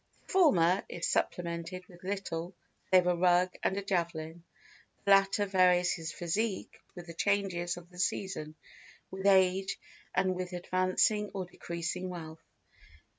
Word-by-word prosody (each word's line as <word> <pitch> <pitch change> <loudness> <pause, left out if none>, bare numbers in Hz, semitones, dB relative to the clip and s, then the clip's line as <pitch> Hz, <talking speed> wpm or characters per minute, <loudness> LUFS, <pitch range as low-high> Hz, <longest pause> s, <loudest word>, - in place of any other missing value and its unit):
The - - -11
former 190 - +4
is 170 - -3
supplemented 170 +1 -2
with 175 -1 -17
little 185 -2 -4 0.3
save 185 -1 +5
a 180 0 +3
rug 180 +1 +3
and 190 - 0
a 200 - -2
javelin; 170 -3 -2 0.6
the 200 - +3
latter 195 +1 +5
varies 180 -2 +4
his 165 -1 -5
physique 195 +6 -2 0.2
with 175 -1 -8
the 170 - -9
changes 180 -2 0
of 175 -1 -11
the 180 - -12
season, 180 -4 -2 0.6
with 190 +1 -2
age, 190 0 +3 0.4
and 185 0 +2
with 180 0 -5
advancing 185 +4 +1
or 190 -2 -2
decreasing 175 +1 -4
wealth. 165 -2 -8
180 Hz, 140 wpm, -31 LUFS, 170-190 Hz, 0.6 s, save